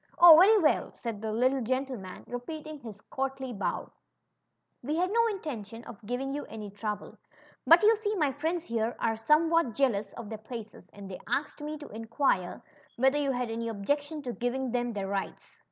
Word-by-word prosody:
— - - -27
Oh! 345 -2 +11
very 395 +7 +7
well," 315 -7 +2
said 225 -4 -5
the 220 -1 -2
lit 250 +4 +3
tle 270 -1 -1
gentleman, 255 -6 -3
repeating 305 +5 -6
his 220 -5 -10
courtly 265 0 -4
bow; 200 - -3 0.9
we 290 +5 -2
had 365 +3 +1
no 465 +1 +4
intention 240 - -5
of 225 -4 -11
giving 255 +3 -2
yon 290 - -4
any 210 -2 -7
trouble; 210 +1 -5 0.5
but 335 +4 +8
yon 440 +2 +7
see 425 0 -1
my 300 -7 +2
friends 320 +5 -2
here 230 -5 -1
are 225 -1 0
somewhat 305 +2 +3
jealous 215 -7 +1
of 235 - -8
their 220 -1 -6
places, 220 0 -9
and 200 -1 -10
they 190 - -7
asked 295 +1 -2
me 300 +1 -4
to 295 - -10
inquire 225 -4 -1 0.3
whether 265 +4 +3
you 280 -2 +1
had 245 -2 -2
any 230 +1 -3
objection 285 +8 -2
to 245 -2 -4
giving 245 +1 -2
them 245 0 0
their 200 -2 -3
rights." 195 0 -5
255 Hz, 190 wpm, -29 LUFS, 225-300 Hz, 0.9 s, Oh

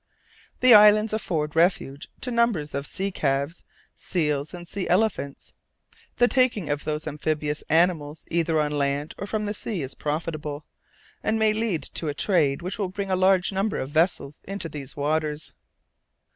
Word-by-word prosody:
The 255 -1 +8
islands 210 +1 +7
afford 160 -8 -2
refuge 160 -5 +1
to 250 - -1
numbers 230 -11 +1
of 140 +1 -3
sea 195 +5 -2
calves, 140 0 -1 0.3
seals, 150 -4 -1
and 175 -1 -9
sea 195 +1 -4
elephants. 180 -7 0 0.6
The 245 - +5
taking 245 - +1
of 145 0 -3
those 155 0 -3
amphibious 150 0 -2
animals 160 -2 +1
either 165 -1 +1
on 150 -1 0
land 145 +1 -1
or 200 - -4
from 215 0 -2
the 205 - -2
sea 205 -6 -3
is 130 - -6
profitable, 150 -1 -4 0.6
and 220 +1 0
may 220 -1 +3
lead 215 -9 -1
to 160 - -3
a 145 - -2
trade 160 -5 +1
which 185 +4 -4
will 195 -3 -1
bring 195 +1 -4
a - - +3
large 185 0 +3
number 195 +2 -1
of 130 - -3
vessels 155 -3 0
into 195 -3 -3
these 145 -1 -7
waters. 150 +1 -1
165 Hz, 165 wpm, -25 LUFS, 150-200 Hz, 0.6 s, The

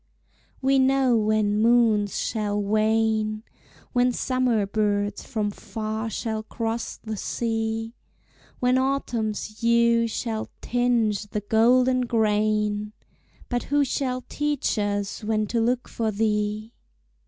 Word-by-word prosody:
We 270 0 +4
know 265 -1 +3
when 215 -1 +2
moons 225 -4 +3
shall 210 -2 -1
wane, 215 +1 +1 0.5
When 250 0 +3
summer 245 -4 +1
birds 205 -1 -1
from 215 -5 -2
far 220 +1 -4
shall 220 0 -3
cross 225 +1 -4
the 220 -1 -6
sea, 225 +1 -2 0.7
When 250 +1 +3
autumn's 225 -6 -2
hue 235 0 +3
shall 220 -1 -3
tinge 230 -4 0
the 210 0 -3
golden 245 +4 +3
grain 210 -1 +1 0.5
But 245 -1 -2
who 285 0 +2
shall 255 -1 -2
teach 295 -6 -1
us 205 +1 -2
when 215 0 0
to 230 +2 -1
look 245 +2 0
for 225 -1 -2
thee? 210 +1 -1
220 Hz, 115 wpm, -25 LUFS, 215-245 Hz, 0.7 s, We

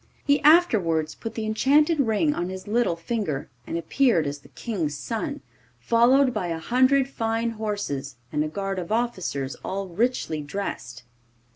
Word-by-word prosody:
He 285 0 +3
afterwards 205 - +4
put 225 - -7
the 220 - -3
enchanted 290 +8 +3
ring 270 +4 +2
on 175 -6 -3
his 190 +1 -7
little 225 -5 +1
finger, 170 - -3 0.2
and 165 - -2
appeared 200 - +2
as 145 0 -4
the - - -18
King's 165 -10 -3
son, 230 - -4 0.4
followed 250 - +4
by 195 -5 -2
a 165 -1 -2
hundred 255 +8 +3
fine 230 -3 -1
horses, 205 - -4 0.2
and 150 0 +1
a - - -2
guard 195 +3 -3
of 175 +1 -6
officers 185 - -1
all 195 0 -4
richly 185 -5 -1
dressed. 145 -8 -5
210 Hz, 155 wpm, -25 LUFS, 165-245 Hz, 0.4 s, afterwards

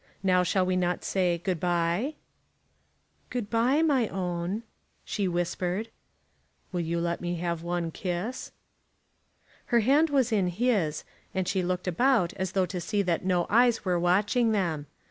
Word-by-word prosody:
Now 185 -1 +4
shall 185 +1 +1
we 185 0 0
not 180 -1 0
say, 180 -3 +1
Good 175 0 -2
bye?" 175 - 0 1.1
"Good 240 -4 -4
bye, 250 +7 +3
my 270 -8 +3
own," 180 +3 -3 0.4
she 200 -2 -1
whispered. 180 +4 -2 0.8
"You 170 -1 -1
will 170 - -1
let 170 0 -2
me 175 0 -2
have 170 -1 -2
one 170 -1 -2
kiss?" 185 +9 -4 1.1
Her 235 -2 +3
hand 285 +8 +4
was 265 -4 +2
in 200 -4 +2
his, 180 -5 0 0.3
and 190 -1 0
she 190 0 +1
looked 180 +1 -2
about 215 -1 +2
as 190 -1 -3
though 190 -1 +2
to 180 0 -5
see 205 +2 0
that 175 -3 0
no 180 -2 +2
eyes 235 +1 +3
were 180 -2 +1
watching 205 +7 +2
them. 165 -8 -1
185 Hz, 155 wpm, -28 LUFS, 175-220 Hz, 1.1 s, Now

